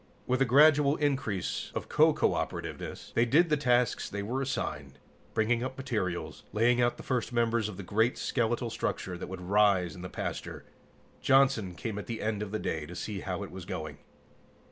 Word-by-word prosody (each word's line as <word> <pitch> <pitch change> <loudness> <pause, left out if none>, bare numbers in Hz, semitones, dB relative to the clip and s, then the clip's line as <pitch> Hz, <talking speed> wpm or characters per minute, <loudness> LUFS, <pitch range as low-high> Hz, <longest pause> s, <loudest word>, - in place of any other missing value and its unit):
With 130 +1 0
a - - +6
gradual 145 +3 +6
increase 135 - -1
of - - -3
co - - +5 0.2
operativeness, - - -5
they 115 - +4
did 155 +8 +4
the 150 - +4
tasks 125 -4 +1
they 100 0 -4
were 125 +6 -2
assigned, 70 - -3 0.4
bringing 115 +2 +2
up 130 +1 -5
materials, 95 - -3
laying 120 +3 +3
out 120 0 +2
the - - -9
first 125 -3 -1
members 115 -2 +1
of 100 - -8
the 100 - -6
great, 110 +6 +1
skeletal 120 -1 -1
structure 90 -3 -3
that 85 - -6
would 95 -1 -6
rise 95 -2 +3
in 90 - -9
the 90 - -6
pasture. - - -5 0.6
Johnson 130 -9 +3
came 105 +4 -4
at - - -8
the 115 -1 -4
end 105 -1 -1
of 105 - -3
the 110 - -2
day 80 -7 -3
to 90 - -9
see 100 +2 -4
how 95 +1 -4
it 100 - -8
was 95 -1 -8
going. 80 -6 -5
110 Hz, 190 wpm, -30 LUFS, 95-125 Hz, 0.6 s, a